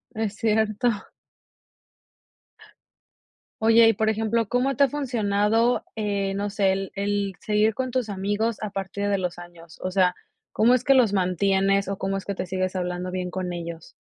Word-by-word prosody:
Es 220 -1 -2
cierto. 220 +1 +1 2.7
Oye, 225 0 +6
y 225 - +5
por 220 +1 0
ejemplo, 225 +1 0
¿cómo 260 +2 +1
te 280 - +5
ha - - -3
funcionado, 230 -3 +1
eh, 200 -3 -1
no 200 +1 -2
sé, 200 -1 +2
el 195 0 -3
el 200 -1 -1
seguir 210 0 +1
con 255 0 -2
tus 250 -3 -1
amigos 205 +3 -1
a 210 - -4
partir 195 +1 -3
de 200 -1 +1
los 180 -2 -3
años? 175 -1 -13
O 185 - -2
sea, 185 -1 +3 0.4
¿cómo 235 +3 +4
es 250 - +2
que 275 - +4
los 235 -6 +4
mantienes, 195 +1 +2
o 195 - -2
cómo 195 0 -1
es 195 - -7
que 200 - -2
te 185 - -5
sigues 185 +1 -2
hablando 180 0 -3
bien 180 -1 -3
con 180 -1 -4
ellos? 170 -1 -7
200 Hz, 175 wpm, -24 LUFS, 190-225 Hz, 2.7 s, Oye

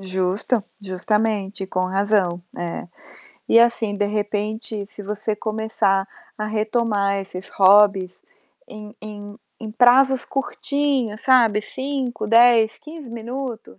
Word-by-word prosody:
Justo. 190 +4 -1 0.2
Justamente, 200 +1 -2
com 185 -1 -2
razão, 190 -2 0
é. 175 -1 -5 0.6
E, 230 - +6
assim, 230 -3 +2
de 205 0 0
repente, 210 0 -3
se 205 - -11
você 210 +1 -3
começar 215 -3 0 0.3
a 215 - -2
retomar 215 -2 0
esses 190 -1 -6
hobbies, 195 -1 +4 0.5
em 210 -1 -11
em 205 -1 -9 0.2
em 220 -2 -6
prazos 255 +3 +4
curtinhos, 275 -5 -2
sabe, 235 -5 +4
5, 260 -5 -4
10, 230 -1 +5
15 310 -3 -11
minutos, 235 0 -7
215 Hz, 115 wpm, -21 LUFS, 200-235 Hz, 0.6 s, E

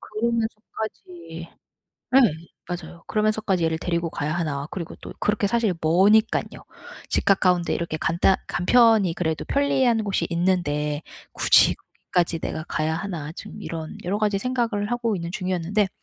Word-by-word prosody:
그러면서까지 215 -7 -4 0.7
예 - - +10 0.5
맞아요. 175 -1 -7
'그러면서까지 215 -4 +1
얘를 160 0 0
데리고 170 -1 -1
가야 150 +2 -2
하나.' 145 -5 -2
그리고 175 -5 -6
또 - - -8
그렇게 210 -1 +1
사실 225 -4 +1
머니깐요. 200 +8 +3 0.4
집 - - 0
가까운 180 -3 +3
데 - - -1
이렇게 170 -2 -3
간단 170 +4 +2
간편히 215 -1 +4
그래도 160 -3 -2
편리한 265 -5 +2
곳이 200 -2 0
있는데 155 -4 0 0.3
'굳이 - - +5
거기까지 170 -2 -2
내가 155 0 -4
가야 155 +1 -1
하나.' 165 -5 -5
지금 210 - -10
이런 160 -2 -6
여러 195 +4 -1
가지 210 -2 +1
생각을 230 -3 -1
하고 235 -3 0
있는 170 -1 -5
중이었는데 185 +2 0
185 Hz, 350 characters per minute, -24 LUFS, 165-215 Hz, 0.7 s, 예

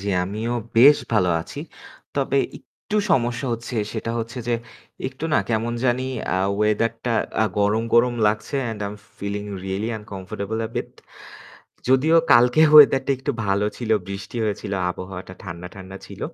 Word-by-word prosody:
জি, 100 - -4 0.2
আমিও 110 +5 -3 0.2
বেশ 140 +5 +8 0.2
ভালো 95 -5 +3
আছি। 140 - -8 0.5
তবে - - +1 0.2
একটু 215 - -7
সমস্যা 120 0 +1
হচ্ছে 115 +2 -5 0.2
সেটা 115 0 -3
হচ্ছে 115 +2 -5
যে, 120 - +2 0.5
একটু 130 +4 -8
না - - +5
কেমন 115 +1 0
জানি 125 0 +1 0.3
আ - - +1 0.2
weather 105 +2 +2
টা 120 -2 +1 0.3
আ - - +4
গরম, 105 +2 +2
গরম, 120 +1 +4
লাগছে 105 +6 -1
and 110 - -6
I'm 105 +1 -6 0.2
feeling 100 +1 -4 0.2
really 95 +3 -2
uncomfortable 100 +1 -5
a - - -9
bit - - -3 1.0
যদিও 140 +6 +4 0.2
কালকে 125 +5 +5 0.2
weather 135 -2 +9
টা - - 0
একটু 135 +2 -2 0.2
ভালো 100 +1 +1
ছিল, 120 -3 -5 0.2
বৃষ্টি 100 +4 -6
হয়েছিল, 100 -1 -3 0.2
আবহাওয়াটা 95 0 -8
ঠান্ডা, 90 -1 -7
ঠান্ডা, 95 0 -9
ছিল। - - -11
110 Hz, 160 wpm, -23 LUFS, 100-125 Hz, 1.0 s, weather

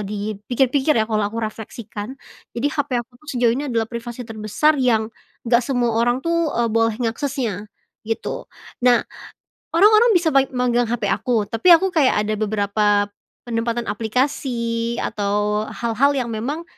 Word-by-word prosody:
dipikir-pikir 215 +8 0
ya 220 - +3
kalau 215 -1 -1
aku 225 - -9
refleksikan 220 +2 -7 0.4
jadi 285 +5 0
hape 285 -4 -1
aku 250 - -55
tuh 305 - -19
sejauh 240 -1 +3
ini 280 +4 -3
adalah 230 -2 0
privasi 235 +1 -7
terbesar 225 +7 0
yang 225 -3 +1 0.3
nggak 235 0 +4
semua 245 -3 0
orang 240 +2 +2
tuh, 335 -2 +1
eee, 235 -1 +1
boleh 225 -1 +2
ngaksesnya, 230 -4 -2 0.4
gitu 225 - -4 0.3
nah, 245 -1 +5 0.8
orang-orang 430 +6 +6
bisa 335 -3 +3
bai 270 0 +5
megang 245 -2 +1
hape 240 0 -1
aku 235 -5 +1
tapi 225 - -2
aku 380 +3 0
kayak 260 -8 +3
ada 215 - 0
beberapa, 205 -1 +1 0.4
penempatan 230 0 -1
aplikasi 235 0 -1
atau 210 0 -1
hal-hal 245 +5 +1
yang 250 -3 -1
memang, 270 +10 -3
235 Hz, 145 wpm, -21 LUFS, 220-265 Hz, 0.8 s, orang-orang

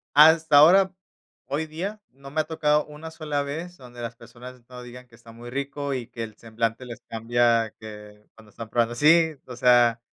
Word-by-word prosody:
Hasta 160 0 +6
ahora, 185 +6 +6 0.6
hoy 150 +3 -3
día, 190 +7 -6
no 135 +1 -14
me 155 +2 +1
ha - - -3
tocado 150 -2 +1
una 150 +2 -10
sola 150 -3 -3
vez 165 +5 -7
donde 120 -2 -12
las 115 -1 -6
personas 125 +1 -13
no 125 -1 -11
digan 125 +1 -12
que 120 - -30
está 115 -1 -16
muy 120 +1 -11
rico, 140 +1 -4
y 125 -3 -5
que 115 - -7
el 110 -1 -9
semblante 115 +2 -3
les 120 -2 -10
cambia 115 -1 +1
que 105 -1 -12
cuando 110 -1 -18
están 110 +2 -10
probando 120 0 0
¡sí!, 160 +4 +4
o 125 - -8
sea, 120 -1 +4
125 Hz, 195 wpm, -24 LUFS, 115-150 Hz, 0.6 s, Hasta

